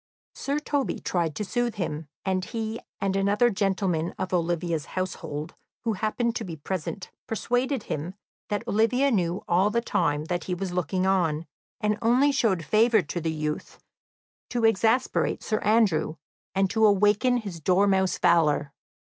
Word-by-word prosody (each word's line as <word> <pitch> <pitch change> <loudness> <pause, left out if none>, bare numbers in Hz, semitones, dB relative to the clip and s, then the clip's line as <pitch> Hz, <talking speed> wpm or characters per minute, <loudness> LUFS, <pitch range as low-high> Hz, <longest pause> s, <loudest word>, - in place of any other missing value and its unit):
Sir 280 +1 -2
Toby 290 -2 -1
tried 170 -4 -1
to 210 - -3
soothe 240 +2 -1
him, 160 -6 -3 0.2
and 190 -1 0
he 225 +2 -4 0.2
and 195 -1 0
another 205 +5 +3
gentleman 190 -4 0
of 185 0 -3
Olivia's 170 -2 0
household 160 -4 -4 0.3
who 225 - 0
happened 225 +3 -1
to 230 - -4
be 175 -5 -6
present 180 +4 -5 0.2
persuaded 245 +2 -1
him 165 +6 -4 0.3
that 205 -1 -2
Olivia 250 +6 +2
knew 180 -4 0
all 185 +4 +3
the 235 - +1
time 155 -9 0
that 175 0 -2
he 180 - -2
was 180 0 -4
looking 180 +1 0
on, 170 -5 +1 0.3
and 210 0 0
only 250 +5 +4
showed 195 - +1
favour 220 -1 +4
to 170 +3 -4
the 165 - -1
youth 155 -1 -4 0.7
to 240 -2 0
exasperate 225 +4 +2
Sir 215 - 0
Andrew 205 -8 +2 0.4
and 195 0 +3
to 220 -1 +1
awaken 210 +5 +3
his 200 -8 -6
dormouse 190 +2 +2
valour. 150 -5 +3
195 Hz, 155 wpm, -26 LUFS, 170-225 Hz, 0.7 s, only